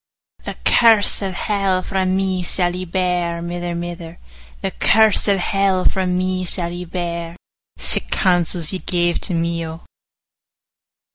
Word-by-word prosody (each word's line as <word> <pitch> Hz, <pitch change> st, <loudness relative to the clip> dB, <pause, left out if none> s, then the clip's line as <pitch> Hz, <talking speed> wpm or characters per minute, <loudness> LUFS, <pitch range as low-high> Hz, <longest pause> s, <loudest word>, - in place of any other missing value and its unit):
'The -, -, -5 dB
curse 225 Hz, -4 st, +4 dB
of 195 Hz, -2 st, -3 dB
hell 195 Hz, -2 st, 0 dB
frae 190 Hz, -1 st, -1 dB
me 185 Hz, 0 st, 0 dB
sall 175 Hz, 0 st, -1 dB
ye 185 Hz, 0 st, -5 dB
bear, 180 Hz, -1 st, -1 dB
Mither, 175 Hz, 0 st, -4 dB
mither; 170 Hz, -1 st, -6 dB, 0.5 s
The -, -, -1 dB
curse 220 Hz, -, +3 dB
of 200 Hz, -1 st, +3 dB
hell 195 Hz, 0 st, +1 dB
frae 190 Hz, -1 st, +1 dB
me 185 Hz, 0 st, -1 dB
sall 175 Hz, -1 st, -1 dB
ye 175 Hz, +1 st, -6 dB
bear: 170 Hz, -1 st, -4 dB, 0.4 s
55 -, -, -7 dB
Sic -, -, -1 dB
counsels 175 Hz, -2 st, +1 dB
ye 185 Hz, -, -3 dB
gave 175 Hz, -1 st, 0 dB
to 180 Hz, -, 0 dB
me, 170 Hz, 0 st, -1 dB
O! 160 Hz, +1 st, -8 dB
180 Hz, 150 wpm, -19 LUFS, 170-190 Hz, 0.5 s, curse